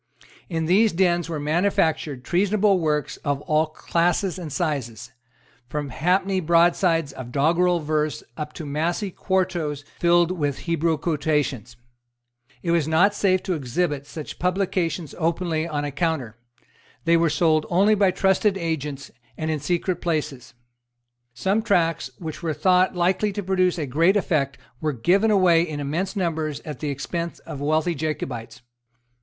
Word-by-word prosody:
In 165 -2 -1
these 200 +6 +4
dens 175 -1 +1
were 160 -2 -3
manufactured 155 -4 0
treasonable 195 +4 +2
works 150 -3 -1
of 145 -2 -2
all 155 +1 +1
classes 175 +4 0
and 165 -4 -6
sizes, 125 - -3 0.6
from 145 +1 -3
halfpenny 185 +7 +1
broadsides 170 -2 +2
of 125 -2 -8
doggrel 170 +6 +2
verse 150 -5 -1
up 150 0 -5
to 160 - -7
massy 170 +7 -1
quartos 175 -7 -1
filled 175 0 +4
with 145 -6 -2
Hebrew 165 -1 +1
quotations. 145 - -1 0.9
It 170 - 0
was 165 -3 +2
not 175 +6 +4
safe 185 -2 +1
to 185 - -1
exhibit 145 0 -2
such 155 -1 -8
publications 180 -3 -1
openly 165 -1 0
on 145 -3 -2
a 145 - -3
counter. 140 -7 -2 0.7
They 170 0 +4
were 165 -1 +3
sold 155 0 +2
only 195 +5 +4
by 200 -2 +4
trusty 190 +3 +2
agents, 150 -5 -4 0.3
and 160 0 -2
in 155 - -1
secret 175 +4 -1
places. 150 -8 -3 0.8
Some 195 - +1
tracts 170 -7 +1
which 160 -3 -7
were 160 -3 -2
thought 185 +4 +3
likely 185 +4 +1
to 205 0 -4
produce 185 -1 +1
a 155 - -2
great 165 +9 +3
effect 145 -8 0 0.2
were 155 -1 -1
given 185 - +2
away 185 -5 +5
in 155 -3 -3
immense 165 +9 -2
numbers 160 -6 -2
at 150 -5 -7
the 150 - -3
expense 170 +5 -4
of 140 - -8
wealthy 155 +4 +1
Jacobites. 125 -6 -5
165 Hz, 150 wpm, -23 LUFS, 150-180 Hz, 0.9 s, away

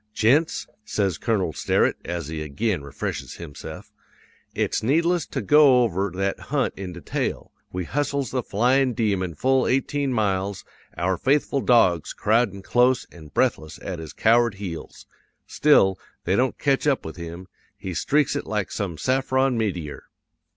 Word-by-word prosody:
"'Gents,' 140 +9 +2 0.2
says 100 -5 -1
Colonel 95 -8 0
Sterett, - - +1
as 85 -3 -4
he 80 0 -5
ag'in 85 +4 -1
refreshes 70 0 -5
hims'ef, 80 -5 -9 0.6
'it's - - 0
needless 165 +7 +1
to - - -4
go 145 -4 +6
over 100 -3 0
that 95 +1 -1
hunt - - 0
in 95 -2 -6
detail. 85 -1 -4 0.2
We 90 0 -3
hustles 140 - -1
the 130 - 0
flyin' 125 +4 +2
demon 95 -7 0
full 130 - +2
eighteen 135 +1 0
miles, 100 -4 -1 0.3
our 90 +2 0
faithful 140 - +1
dogs 90 -11 +3
crowdin' 105 -3 +1
close 125 +3 +3
an' 80 -3 -13
breathless 75 +1 -1
at 90 -3 -5
his 80 -2 -7
coward 115 -1 +3
heels. 95 -5 -7 0.4
Still, 95 - +3 0.2
they 95 - +1
don't 130 +4 +1
catch 140 +1 +1
up 140 -3 +1
with 80 +3 -7
him; 85 +2 -7 0.3
he 95 -2 -5
streaks 145 - +1
it - - -3
like 105 -3 -2
some 95 -7 -3
saffron 130 - +1
meteor. 90 -10 -3
105 Hz, 150 wpm, -24 LUFS, 90-130 Hz, 0.6 s, go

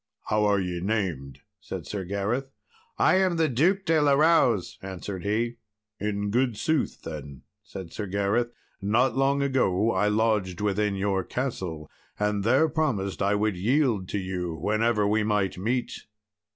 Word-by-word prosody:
"How 105 0 +2
are 100 -1 +3
ye 90 -2 -2
named?" 90 -10 -2 0.2
said - - -7
Sir 100 -3 -4
Gareth. 100 +8 -2 0.5
"I 185 - +4
am 190 -2 +2
the 160 -1 +3
Duke 175 +10 +2
de 160 -2 +3
la 145 -1 +4
Rowse," 140 - +3
answered 95 0 -6
he. 115 +4 -1 0.4
"In 100 0 -2
good 120 -1 +1
sooth," 160 +5 -1
then 70 -4 -8 0.2
said 95 -4 -9
Sir 105 - -4
Gareth, 100 +5 0 0.3
"not 110 +5 +2
long 140 +1 +2
ago 115 -6 +2
I 105 +1 +1
lodged 105 -4 +1
within 105 0 0
your 95 -1 0
castle, 90 - -4 0.3
and 105 -1 0
there 130 +9 +4
promised 140 - -1
I 100 +1 +2
would 105 -1 0
yield 110 -1 +1
to - - -2
you 90 -3 -3
whenever 105 +5 +1
we 110 +2 +2
might 105 -3 0
meet." 120 +5 -2
105 Hz, 155 wpm, -26 LUFS, 95-125 Hz, 0.5 s, I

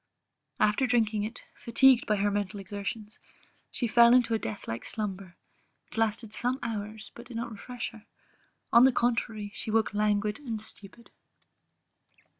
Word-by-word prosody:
After 215 +5 +3
drinking 220 -3 +1
it, 225 +3 -7
fatigued 245 +1 +4
by 210 - +3
her 205 0 +1
mental 205 0 -2
exertions, 205 +2 -6 0.5
she 245 - -2
fell 235 +1 +6
into 240 -2 +3
a 225 - +1
death 110 - -6
like 115 +1 -4
slumber, 195 -4 -4 0.5
which - - -14
lasted 225 0 -1
some 245 +3 0
hours; 215 -1 -5
but 235 +1 -11
did 240 -2 -7
not 235 +1 -4
refresh 240 +3 -6
her, 220 -1 -16 0.7
on 235 +2 +8
the 265 - +6
contrary, 225 -4 -1
she - - -6
awoke 220 0 +1
languid 210 +1 +1
and 235 -7 -4
stupid. 210 +1 -9
220 Hz, 155 wpm, -29 LUFS, 205-235 Hz, 0.7 s, on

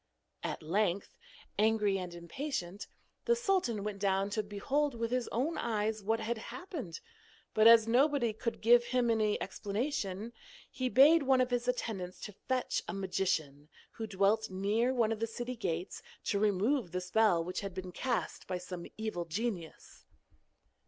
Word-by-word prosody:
At - - -4
length, 190 +3 0 0.4
angry 210 -2 +3
and 180 -1 -6
impatient, 180 - -5 0.4
the 475 - +4
sultan 375 - 0
went 205 -1 -4
down 195 0 +1
to 215 - 0
behold 250 +8 -1
with 230 0 -2
his 250 -1 0
own 280 +8 -1
eyes 220 -1 -1
what 225 +3 0
had 225 +1 -2
happened, 280 - -7 0.5
but 220 +1 +6
as 230 -1 +8
nobody 250 -1 +3
could 230 +2 -4
give 240 +1 +6
him 240 -1 +1
any 215 -2 +1
explanation, 210 -1 -3 0.4
he 255 0 -2
bade 295 +6 +7
one 265 -1 +3
of 250 0 +2
his 245 0 0
attendants 210 -7 -2
to 210 - -7
fetch 260 -1 0
a - - -3
magician, 170 -7 -1 0.2
who 225 -1 -6
dwelt 210 +2 +2
near 205 +6 +1
one 235 -4 +2
of 225 - -2
the 230 - 0
city 240 +2 -5
gates, 180 -5 -3 0.2
to 200 - 0
remove 215 +3 +2
the 180 - -1
spell 180 -1 +3
which 180 +2 -4
had 195 -2 -6
been 185 -1 -5
cast 245 +5 -2
by 185 - -2
some 180 -1 -7
evil 215 -6 -3
genius. 180 -1 -5
220 Hz, 160 wpm, -32 LUFS, 190-240 Hz, 0.5 s, as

